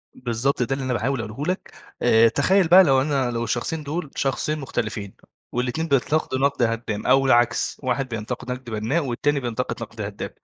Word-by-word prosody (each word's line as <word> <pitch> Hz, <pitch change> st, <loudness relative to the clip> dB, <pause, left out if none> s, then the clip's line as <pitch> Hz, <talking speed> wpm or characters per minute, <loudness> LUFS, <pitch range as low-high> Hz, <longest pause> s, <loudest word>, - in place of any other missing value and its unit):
بالضبط، 125 Hz, +2 st, 0 dB
ده 135 Hz, +3 st, -1 dB
اللي 135 Hz, -1 st, -3 dB
أنا 130 Hz, -, -1 dB
باحاول 125 Hz, +2 st, -1 dB
أقوله 110 Hz, +7 st, -5 dB
لك. -, -, -13 dB, 0.3 s
آآ 115 Hz, -1 st, +5 dB
تخيّل 190 Hz, -, +3 dB
بقى 185 Hz, +3 st, +8 dB
لو 135 Hz, -5 st, +4 dB
أنا 135 Hz, -4 st, 0 dB
لو 115 Hz, 0 st, -2 dB
الشخصين 125 Hz, +7 st, -2 dB
دول، 150 Hz, 0 st, -4 dB
شخصين 150 Hz, +3 st, -1 dB
مختلفين 110 Hz, -6 st, -4 dB, 0.4 s
والاتنين 125 Hz, +7 st, -2 dB
بيتنقدوا 140 Hz, 0 st, +1 dB
نَقْد 140 Hz, -2 st, +1 dB
هدّام 115 Hz, -2 st, -2 dB
أو 135 Hz, 0 st, +4 dB
العكس، 120 Hz, -3 st, +2 dB
واحد 130 Hz, +1 st, -1 dB
بينتقد 120 Hz, +3 st, -5 dB
نَقْد 125 Hz, -1 st, -6 dB
بنّاء 115 Hz, +9 st, -1 dB
والتاني 140 Hz, +4 st, 0 dB
بينتقد 125 Hz, -1 st, -3 dB
نَقْد 110 Hz, 0 st, -9 dB
هدّام، 100 Hz, 0 st, -5 dB
125 Hz, 180 wpm, -23 LUFS, 115-140 Hz, 0.4 s, بقى